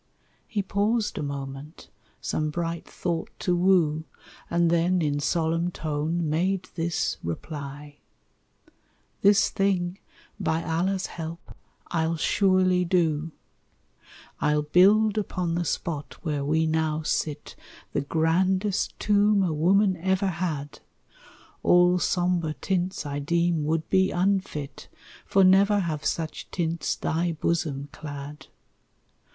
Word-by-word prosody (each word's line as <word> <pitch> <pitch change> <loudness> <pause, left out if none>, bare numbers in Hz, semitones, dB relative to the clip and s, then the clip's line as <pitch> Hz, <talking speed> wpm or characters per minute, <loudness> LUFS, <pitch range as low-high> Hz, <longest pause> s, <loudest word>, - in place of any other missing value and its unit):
He 210 -4 -2
paused 205 +2 0
a - - -2
moment, 140 +2 -7 0.3
some 155 0 -1
bright 165 +1 -3
thought 170 -2 -3
to 180 - +1
woo, 175 -4 +3 0.4
And 170 0 +2
then, 175 +2 +2
in 145 -3 0
solemn 165 +3 0
tone, 160 +1 -2
made 180 +4 0
this 170 0 -1
reply: 145 - -6 1.2
"This 200 0 +5
thing, 190 -1 0 0.4
by 165 -4 0
Allah's 185 +4 0
help, 165 0 -8 0.3
I'll 165 0 0
surely 185 +1 +3
do: 165 -3 +1 1.1
"I'll 150 0 +2
build 205 +7 +4
upon 180 -4 -2
the 175 +1 0
spot 150 -4 -3
where 150 -4 -1
we 160 +3 +1
now 160 0 0
sit 150 -1 -2 0.4
The - - +1
grandest 185 +6 0
tomb 205 -1 +3
a 175 -4 0
woman 185 +5 +3
ever 190 +3 +1
had; 160 -5 -4 0.8
All 180 0 +5
sombre 175 -4 0
tints 185 -2 -2
I 145 0 -3
deem 170 +1 +1
would 160 +1 -1
be 190 0 +4
unfit; 185 -6 -1 0.4
For 195 - +4
never 195 +2 +5
have 155 -4 -3
such 160 -2 -3
tints 170 -2 -1
thy 170 +2 -1
bosom 150 -3 -2
clad. 145 0 -8
170 Hz, 115 wpm, -26 LUFS, 155-185 Hz, 1.2 s, This